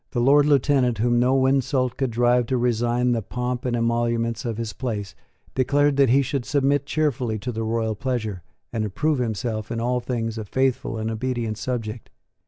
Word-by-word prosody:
The 120 - 0
Lord 140 +4 +5
Lieutenant, 135 -4 +3
whom 120 +2 +2
no 130 +2 +3
insult 130 -1 +1
could 135 -2 -1
drive 120 +1 +2
to 130 - 0
resign 120 +1 +1
the 115 -2 +1
pomp 125 +3 -3
and 125 -1 0
emoluments 115 0 0
of 115 -2 -2
his 115 -2 -4
place, 105 -7 -4 0.4
declared 145 +2 +2
that 140 -3 +5
he 135 +3 +4
should 135 0 -2
submit 140 0 +1
cheerfully 135 -8 0
to 125 +4 -4
the 115 -1 -4
royal 110 0 -1
pleasure, 110 -4 -3 0.3
and 110 -2 -1
approve 140 +8 0
himself 110 -2 -2
in 115 - -2
all 125 +2 0
things 115 -2 -3
a 110 - -5
faithful 130 0 0
and 110 +1 -2
obedient 115 -2 -2
subject. 115 -2 -4
120 Hz, 185 wpm, -23 LUFS, 115-130 Hz, 0.4 s, Lord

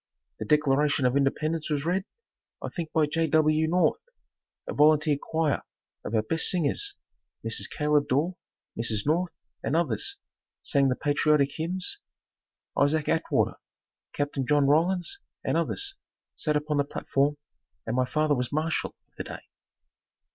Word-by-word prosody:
The - - -3
Declaration 145 -2 +3
of 125 +1 +2
Independence 155 +3 0
was 145 -1 -1
read, 185 +3 0 0.5
I - - -5
think 165 -3 -5
by 160 -1 +3
J. 165 +2 0
W. 155 +1 +3
North, 170 -1 +2 0.7
a - - -4
volunteer 150 0 +4
choir 160 -3 0 0.4
of 115 - -3
our 110 - +3
best 165 +8 0
singers 185 - +1 0.5
Mrs. - - -2
Caleb 150 -1 +1
Dorr, 155 +8 +1 0.4
Mrs. 110 -3 -1
North 165 +2 0 0.2
and 140 - -1
others 170 - 0 0.5
sang 140 -2 +3
the 130 - +1
patriotic 145 0 +2
hymns, 180 - -3 0.8
Isaac 145 +2 +2
Atwater, 160 - +1 0.5
Capt. 145 -1 -2
John 145 +2 +3
Rollins 175 - +2 0.2
and - - 0
others 400 0 0 0.4
sat 150 -2 0
upon 150 0 0
the 145 - +3
platform 140 +1 0 0.5
and 115 - -2
my 130 0 +2
father 155 +3 +1
was 125 -3 -1
marshall 155 +2 -1
of - - -44
the - - -3
day. - - -8
150 Hz, 145 wpm, -27 LUFS, 140-165 Hz, 0.8 s, volunteer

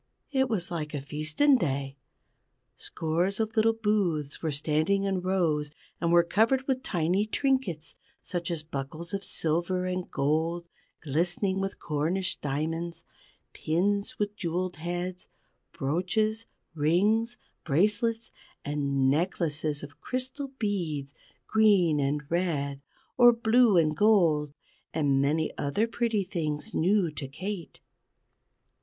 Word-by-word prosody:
It 265 -2 +2
was 180 -6 -2
like 155 -3 -3
a - - -1
feasten 155 - +2
day. 135 -4 -2 0.8
Scores 175 +6 -1
of 220 0 -1
little 225 0 +4
booths 195 -10 0
were 160 - -1
standing 155 +6 +1
in 195 -2 0
rows, 170 -6 +1 0.3
and 170 0 +1
were 170 0 +6
covered 230 +9 +2
with 260 -2 0
tiny 180 +1 0
trinkets 215 - 0 0.3
such 175 -1 -3
as 165 -3 -2
buckles 155 +4 -6
of 195 0 -2
silver 175 +3 -1
and 185 0 -3
gold 160 +4 0 0.4
glistening 175 +6 0
with 195 0 -3
Cornish 170 +5 -1
diamonds, 165 +4 -3 0.5
pins 200 +6 0
with 210 0 -2
jewelled 180 0 -2
heads, 175 +2 -4 0.4
brooches, 215 +10 -1 0.3
rings, 205 +10 +2 0.3
bracelets, 210 +8 +1 0.3
and 140 -2 0
necklaces 155 -1 0
of 145 0 -11
crystal 260 +2 -3
beads, 165 - -2 0.3
green 200 -8 +4
and 145 +1 0
red 145 -5 -1 0.4
or 240 -1 +9
blue 230 -2 +4
and 155 -2 +3
gold; 160 -8 +3 0.4
and 140 -3 +2
many 155 +3 0
other 145 +10 +1
pretty 230 -3 0
things 165 +1 -3
new 185 0 +2
to 140 -2 -5
Kate. 175 +5 -6
175 Hz, 120 wpm, -28 LUFS, 150-205 Hz, 0.8 s, or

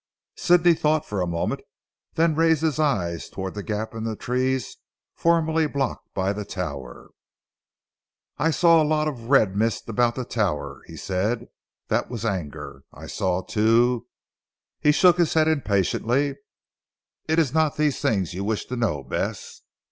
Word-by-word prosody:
Sidney 175 -1 +4
thought 155 -1 +1
for 100 -7 -3
a 90 - 0
moment, 85 -1 -2 0.5
then 165 0 +3
raised 160 0 +2
his 155 -2 0
eyes 95 - 0
towards 95 -1 -5
the 105 - -4
gap 105 +2 -4
in 115 -1 -5
the 110 -1 -2
trees 130 +3 -1 0.4
formerly 165 -1 +2
blocked 140 -2 -3
by 95 +1 0
the 105 +1 -4
tower. 70 -11 -6 1.3
"I 155 +5 +2
saw 165 0 +5
a - - +3
lot 155 0 +1
of 120 -6 -6
red 110 -9 +4
mist 110 +1 0
about 120 +1 +1
the 130 - -4
tower," 105 -10 -2
he - - -10
said, 105 +6 -2 0.4
"that - - 0
was 115 -3 -5
anger. 75 -8 -4
I - - -11
saw 95 -1 -1
too 115 +3 +2 0.4
" - - -68
he 150 0 +5
shook 175 +3 +5
his 170 -2 +2
head 160 -1 +4
impatiently. 135 - +1 0.9
"It 160 +1 +1
is 155 -6 +2
not 155 -2 +2
these 150 -3 +1
things 100 - 0
you 95 +2 -4
wish 110 +1 -2
to 125 - -3
know 100 - -1
Bess?" 65 - -4
120 Hz, 165 wpm, -24 LUFS, 100-155 Hz, 1.3 s, saw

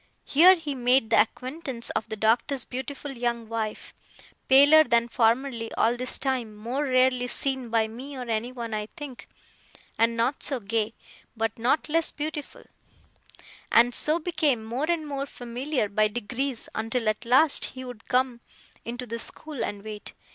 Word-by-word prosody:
Here 355 +6 +7
he 315 -5 -4
made 250 -2 +2
the 220 - +7
acquaintance 255 +2 -4
of - - -3
the 220 - -3
Doctor's 235 +5 +1
beautiful 270 +3 -6
young 235 -2 -2
wife 220 -1 -4 0.5
(paler 285 +4 +7
than 235 -5 +2
formerly, 235 0 0
all 230 +2 +2
this 255 +1 0
time; 255 -5 -2
more 240 +7 -3
rarely 255 -1 +2
seen 265 -1 -1
by 225 -1 +2
me 260 +5 -8
or 255 - -4
anyone, 230 +1 -3
I 210 0 -3
think; 280 -4 -9 0.7
and 230 +1 +2
not 245 +4 0
so 270 -3 +1
gay, 220 +1 -2 0.4
but 225 0 -1
not 260 +7 +1
less 325 +1 +1
beautiful), 310 - -6 1.1
and 240 +1 +5
so 305 +6 +4
became 310 -9 0
more 255 +8 -3
and 335 -3 0
more 280 -1 -4
familiar 250 0 -3
by 215 +1 +2
degrees, 240 +4 -2
until, 225 +1 -2
at 215 +1 0
last, 265 +5 +4
he 260 0 -8
would 245 -3 -10
come 250 -1 0 0.4
into 245 +2 -5
the 230 0 -5
school 300 +3 -4
and 205 -1 -5
wait. 215 -1 -8
245 Hz, 160 wpm, -26 LUFS, 230-275 Hz, 1.1 s, Here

